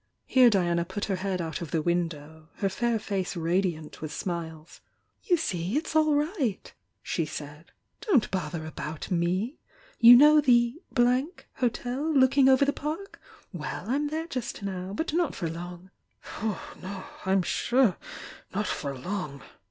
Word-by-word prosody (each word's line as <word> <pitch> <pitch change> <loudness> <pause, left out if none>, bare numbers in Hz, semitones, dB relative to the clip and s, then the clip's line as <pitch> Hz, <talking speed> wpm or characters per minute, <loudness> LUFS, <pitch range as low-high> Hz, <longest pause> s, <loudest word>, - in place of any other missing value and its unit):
Here 255 -2 +6
Diana 175 -5 +2
put 205 +4 -4
her 195 -2 -1
head 185 -1 -2
out 165 +1 -4
of 170 - -5
the 160 -2 -1
window, 160 -2 -2
— - - -37
her 195 - +2
fair 235 +4 0
face 195 -3 -3
radiant 170 -2 -1
with 155 -1 -5
smiles. 160 -2 -6 0.4
"You 355 - +3
see, 190 - -2
it's 315 0 -3
all 310 -1 +4
right!" 290 - -1 0.3
she 165 - -1
said— 150 +1 -7 0.4
"Don't 295 - +3
bother 170 -3 -3
about 155 +2 -6
me! 185 - 0 0.4
You 235 +1 +10
know 300 +4 +7
the 240 +2 +3 0.8
Hotel 255 +4 -1
looking 265 0 +5
over 265 +1 +5
the 285 - +1
Park? 315 +7 -5 0.3
Well, 175 +3 -5
I'm 285 +5 0
there 315 +2 -3
just 255 -9 -5
now, 185 -1 -4
but 305 - -3
not 340 -2 +1
for 165 -4 -3
"No, 175 +2 -8 1.3
I'm 190 0 +2
sure 240 +1 +2 0.6
not 210 +2 0
for 140 -7 -3
long!" 150 -2 -5
195 Hz, 150 wpm, -27 LUFS, 170-260 Hz, 1.3 s, You